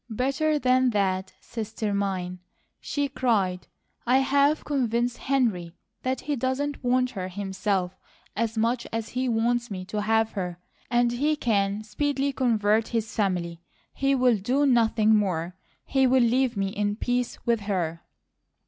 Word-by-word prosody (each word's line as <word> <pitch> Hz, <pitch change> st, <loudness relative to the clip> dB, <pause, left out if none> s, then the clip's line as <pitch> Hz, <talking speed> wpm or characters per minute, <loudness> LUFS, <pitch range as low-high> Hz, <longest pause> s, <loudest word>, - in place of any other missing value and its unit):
"Better 275 Hz, +7 st, 0 dB
than 255 Hz, -1 st, +3 dB
that, 190 Hz, -3 st, 0 dB
sister 220 Hz, -2 st, -4 dB
mine!" 185 Hz, -3 st, -2 dB, 0.4 s
she 285 Hz, -1 st, -2 dB
cried. 205 Hz, -10 st, 0 dB, 0.4 s
"I 250 Hz, +2 st, +3 dB
have 280 Hz, +3 st, +2 dB
convinced 240 Hz, -4 st, 0 dB
Henry 220 Hz, -11 st, 0 dB, 0.3 s
that 255 Hz, 0 st, -2 dB
he 295 Hz, 0 st, -2 dB
doesn't 270 Hz, +3 st, -2 dB
want 250 Hz, 0 st, +2 dB
her 190 Hz, -6 st, -4 dB
himself 190 Hz, -1 st, -2 dB, 0.4 s
as 225 Hz, +1 st, -1 dB
much 235 Hz, +2 st, 0 dB
as 225 Hz, 0 st, -3 dB
he 255 Hz, 0 st, -1 dB
wants 235 Hz, +1 st, +1 dB
me 185 Hz, -3 st, -5 dB
to 210 Hz, +2 st, -3 dB
have 220 Hz, +1 st, +2 dB
her, 180 Hz, -4 st, -4 dB, 0.3 s
and 240 Hz, 0 st, +3 dB
he 290 Hz, +6 st, +1 dB
can 205 Hz, -5 st, 0 dB
speedily 275 Hz, +5 st, -1 dB
convert 220 Hz, -4 st, +2 dB
his 225 Hz, -1 st, -2 dB
family. 175 Hz, -5 st, -1 dB, 0.3 s
He 275 Hz, 0 st, +1 dB
will 250 Hz, -3 st, +3 dB
do 255 Hz, +9 st, +1 dB
nothing 225 Hz, -4 st, +4 dB
more! 180 Hz, -4 st, -1 dB, 0.3 s
He 265 Hz, -1 st, +3 dB
will 255 Hz, 0 st, +4 dB
leave 245 Hz, 0 st, +2 dB
me 195 Hz, -1 st, 0 dB
in 205 Hz, +1 st, -1 dB
peace 245 Hz, +2 st, -1 dB
with 235 Hz, -1 st, +2 dB
her." 170 Hz, -4 st, -1 dB
230 Hz, 150 wpm, -26 LUFS, 200-255 Hz, 0.4 s, nothing